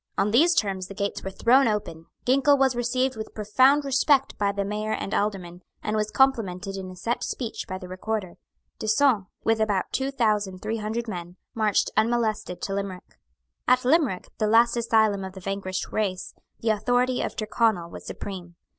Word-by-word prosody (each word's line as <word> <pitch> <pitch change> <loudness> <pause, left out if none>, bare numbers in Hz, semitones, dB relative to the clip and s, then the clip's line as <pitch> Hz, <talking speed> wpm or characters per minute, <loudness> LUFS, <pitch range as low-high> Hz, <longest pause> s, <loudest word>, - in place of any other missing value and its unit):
On 200 +2 +2
these 325 +10 +5
terms 190 -3 0
the 195 - -10
gates 200 0 -3
were 195 - -3
thrown 245 +7 +4
open. 185 -7 -3 0.2
Ginkell 275 +3 +4
was 265 -2 +3
received 255 +2 0
with 220 0 -7
profound 260 +8 +3
respect 275 0 +2
by 200 -1 +2
the 200 0 -2
Mayor 210 +2 -2
and 195 - -4
Aldermen, 185 -4 -2 0.2
and 215 - -1
was 215 0 0
complimented 200 -8 +1
in 190 -1 -6
a 185 - -10
set 230 +6 -2
speech 235 -3 -4
by 185 -2 -4
the 185 -1 -9
Recorder. 185 0 -4 0.4
D'Usson, 220 -2 +2 0.2
with 225 0 +2
about 205 -4 0
two 270 0 -1
thousand 210 -7 0
three 220 +2 -2
hundred 220 +2 -3
men, 175 -4 -6 0.2
marched 215 -2 +1
unmolested 220 -4 0
to 195 - -2
Limerick. 195 -2 -6 0.5
At 255 0 +3
Limerick, 275 - +2
the 215 - +2
last 235 +2 +4
asylum 220 -4 +2
of 190 -1 -7
the 190 - -9
vanquished 190 0 -4
race, 190 -4 -2 0.3
the 225 - 0
authority 245 +4 +1
of - - -3
Tyrconnel 215 -5 0
was - - -9
supreme. 180 -3 -7
215 Hz, 180 wpm, -25 LUFS, 195-240 Hz, 0.5 s, these